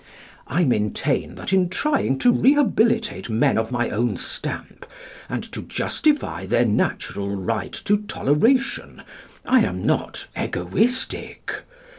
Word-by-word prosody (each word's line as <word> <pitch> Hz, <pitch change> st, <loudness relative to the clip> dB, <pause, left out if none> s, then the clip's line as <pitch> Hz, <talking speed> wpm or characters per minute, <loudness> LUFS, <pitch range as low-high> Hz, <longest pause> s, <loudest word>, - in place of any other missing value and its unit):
I 170 Hz, +7 st, +1 dB
maintain 105 Hz, -7 st, 0 dB
that -, -, -4 dB
in 185 Hz, -2 st, +3 dB
trying 275 Hz, -, +1 dB
to 245 Hz, -, +6 dB
rehabilitate 235 Hz, -, +2 dB
men 110 Hz, +1 st, +2 dB
of 110 Hz, +1 st, -1 dB
my 120 Hz, -1 st, 0 dB
own 120 Hz, +3 st, 0 dB
stamp -, -, -6 dB, 0.4 s
and -, -, -3 dB
to -, -, -5 dB
justify 300 Hz, -2 st, -1 dB
their 120 Hz, -, +3 dB
natural 100 Hz, -2 st, -1 dB
right 105 Hz, +3 st, -3 dB
to 205 Hz, -, +4 dB
toleration 210 Hz, -, 0 dB, 0.4 s
I 260 Hz, 0 st, +5 dB
am 90 Hz, -, -1 dB
not -, -, -1 dB
egoistic. 215 Hz, -, -1 dB
175 Hz, 120 wpm, -23 LUFS, -, 0.4 s, to